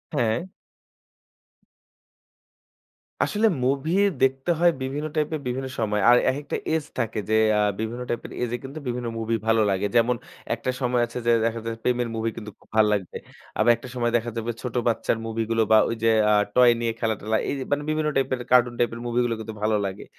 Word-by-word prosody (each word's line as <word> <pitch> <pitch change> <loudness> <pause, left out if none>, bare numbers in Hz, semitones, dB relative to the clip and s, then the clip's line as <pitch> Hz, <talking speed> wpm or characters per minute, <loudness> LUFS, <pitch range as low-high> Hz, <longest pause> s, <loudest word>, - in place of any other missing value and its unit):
হ্যাঁ। 120 +9 0 2.7
আসলে 215 +2 +2 0.2
movie 140 +6 0 0.3
দেখতে 135 +5 +2
হয় 175 0 +5
বিভিন্ন 140 +3 -3
type 155 0 0
এর 155 - -5
বিভিন্ন 130 +2 -2
সময়। 105 -2 0
আর 120 - +7
একেকটা 145 +2 -4 0.2
age 160 -2 -1
থাকে 115 -1 -1
যে 110 - +3 0.2
আ - - +3 0.2
বিভিন্ন 115 +3 -3
type 120 - -2
এর - - -8
age 120 -1 -2
এ - - -3
কিন্তু 135 +4 -7
বিভিন্ন 120 0 -3
movie 115 0 -1
ভালো 115 0 +4
লাগে। 100 +1 0
যেমন 120 +1 +4 0.4
একটা 120 +2 -5
সময় 125 -1 +1
আছে 120 +1 -8
যে - - +5
দেখা 115 0 -1
যায় 115 - -2
যে - - -20
প্রেমের 125 -1 +1
movie 115 0 -2
কিন্তু 105 -1 -7
খুব - - -26
ভালো 110 -1 +6
লাগবে। 95 -4 -3 0.4
আবার 120 - +5
একটা 115 +3 -11
সময় 120 -1 0
দেখা 120 0 -4
যাবে 115 +1 -2
ছোট 125 -2 -5
বাচ্চার 115 0 +1
মুভি 115 0 -2
গুলো 115 0 +3
বা 110 - +8
ওই 115 - -1
যে 115 - +5 0.2
আ - - +5 0.2
toy 125 -1 +7
নিয়ে 115 -1 -1
খেলা 110 -1 0
টেলা 110 +1 0
এই - - 0 0.2
মানে 145 +1 +1
বিভিন্ন 155 0 0
type 135 -1 +1
এর 125 - -2
cartoon 120 -1 +4
type 120 -1 +1
এর - - -7
movie 120 +1 +1
গুলো 120 - 0
কিন্তু 110 0 -6
ভালো 110 0 +2
লাগে। 95 0 -5
120 Hz, 210 wpm, -24 LUFS, 115-130 Hz, 2.7 s, বা